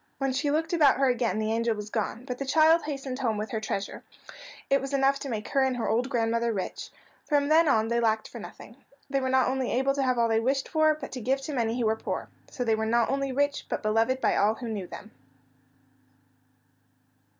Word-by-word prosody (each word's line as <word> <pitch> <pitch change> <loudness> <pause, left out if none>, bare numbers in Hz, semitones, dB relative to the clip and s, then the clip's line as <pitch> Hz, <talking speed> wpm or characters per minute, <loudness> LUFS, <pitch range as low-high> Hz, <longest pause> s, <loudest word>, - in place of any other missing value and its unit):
When 270 -1 -1
she 280 +3 0
looked 320 +3 0
about 300 -5 +5
her 270 0 +3
again 245 -3 0
the 215 0 -1
angel 230 0 0
was 210 0 -7
gone, 230 +2 -3
but 250 -2 -5
the - - -1
child 320 +3 +4
hastened 275 -3 -5
home 230 -5 0
with 215 +1 -4
her 220 - -1
treasure. 200 -2 -4 0.6
It 275 - +2
was 275 +1 -3
enough 275 0 +2
to 280 - -6
make 215 -3 -4
her 275 - +2
and 260 -1 +1
her 230 - -2
old 240 +4 0
grandmother 230 -2 0
rich. 195 -4 -4 0.3
From 290 -1 +1
then 320 +1 +5
on 220 -5 +3
they 235 +1 +1
lacked 220 -2 +1
for 235 - -9
nothing. 225 +2 -11 0.3
They 275 - +2
were 260 - -1
not 260 0 +3
only 260 0 -1
able 265 +2 +1
to 275 - -1
have 255 -2 +1
all 235 -1 +3
they 225 -1 +2
wished 265 +3 0
for, 310 -1 +3
but 295 -2 -8
to 255 - -6
give 265 +4 0
to 295 +2 -5
many 235 -2 -1
who 235 - +1
were 220 0 +2
poor. - - -5 0.2
So 250 - -4
they 225 -2 +2
were 220 0 -1
not 235 +2 +2
only 275 0 -1
rich, 285 +2 -1
but - - -3
beloved 225 +4 +1
by - - +2
all 210 +2 +3
who 240 - -7
knew 200 -5 -4
them. 215 - -10
250 Hz, 235 wpm, -27 LUFS, 225-275 Hz, 0.6 s, about